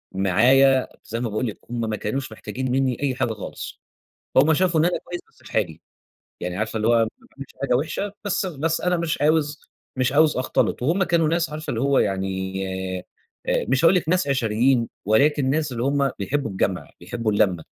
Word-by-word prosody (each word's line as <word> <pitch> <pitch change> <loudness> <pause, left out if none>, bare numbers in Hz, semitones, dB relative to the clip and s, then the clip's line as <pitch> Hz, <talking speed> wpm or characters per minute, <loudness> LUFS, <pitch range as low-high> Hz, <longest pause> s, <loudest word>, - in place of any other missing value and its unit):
معايا 130 +8 +4 0.2
زي 115 - -4
ما 120 -2 -2
باقول 110 +4 -1
لِك، 105 - -6
هم 120 0 -3
ما 110 - -1
كانوش 130 +4 -3
محتاجين 130 +3 -4
منّي 130 -2 +1
أي 130 -3 +1
حاجة 120 -4 0
خالص، 105 - -8 0.5
فهُم 150 +4 +5
شافوا 175 -2 +2
إن - - +4
أنا 175 - +1
كويس 175 0 -6
بس - - -29
في - - -13
حالي، 85 -7 -1 0.6
يعني 90 +1 -4
عارفة 110 +1 -2
اللي 110 +1 0
هو - - +5
ما 115 -1 +3 0.2
باعملش 140 -1 -11
حاجة 135 -3 +2
وِحشة 180 +9 -2
بس، 195 -1 0
بس 165 -1 -1
أنا 180 0 +1
مش 165 -3 -2
عاوز 150 0 +2 0.4
مش 130 0 +1
عاوز 150 -1 +4
أختلِط، 130 - 0
وهم 170 +9 +2
كانوا 170 -3 +2
ناس 165 0 +1
عارفة 155 +1 -6
اللي 115 - -2
هو 140 0 +3
يعني 95 -1 -1 0.8
آآ، - - +1
مش 135 +5 +3
هاقول 175 +3 +6
لِك 165 -3 0
ناس 180 -4 +2
عشريين، 120 -1 +2 0.2
ولكن 135 +5 +3
ناس 150 -1 0
اللي 120 0 -3
هم 140 -1 +1
بيحبوا 115 +3 -1
الجَمْع 95 -1 -2
بيحبوا 110 +5 -2
اللمَّة. 95 -5 +2
130 Hz, 195 wpm, -23 LUFS, 110-155 Hz, 0.8 s, هاقول